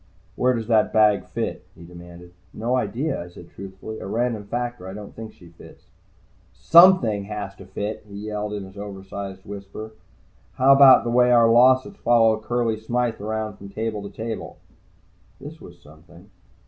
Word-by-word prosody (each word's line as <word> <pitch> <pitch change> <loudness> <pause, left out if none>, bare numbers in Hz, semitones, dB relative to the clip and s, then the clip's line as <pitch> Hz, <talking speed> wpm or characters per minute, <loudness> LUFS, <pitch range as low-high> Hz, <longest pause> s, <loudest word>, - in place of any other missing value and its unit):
"Where 125 0 +1
does 115 -1 -4
that 110 -1 +2
bag 105 -2 +3
fit?" - - -5
he 85 - -14
demanded. 85 0 -13 0.2
"No 120 +3 -1
idea," 125 - -2
I - - -12
said 85 0 -14
truthfully. 100 +3 -9
"A - - -7
random 115 0 -2
factor. 120 -2 -5
I 95 - -8
don't 105 -1 -10
think 110 -1 -9
she 85 - -17
fits." 85 - -17 0.7
"Something 165 - +5
has 105 -2 -6
to 95 - -13
fit!" 105 +3 -5
he 100 - -11
yelled 105 0 -5
in 100 -1 -5
his 95 +1 -12
oversized 95 -1 -8
whisper. 100 +2 -9 0.6
"How 135 +2 +5
about 135 -1 +7
the 120 - -2
way 125 +1 +4
our 120 -1 +5
losses 130 - +4
follow 115 - +3
Curley 115 0 -1
Smythe 120 0 -2
around 110 -1 -4
from 100 0 -11
table 110 0 -4
to 100 - -8
table?" 110 +1 -7 0.8
This 150 +4 -11
was 85 0 -14
something. 85 +5 -18
110 Hz, 170 wpm, -23 LUFS, 100-120 Hz, 0.8 s, about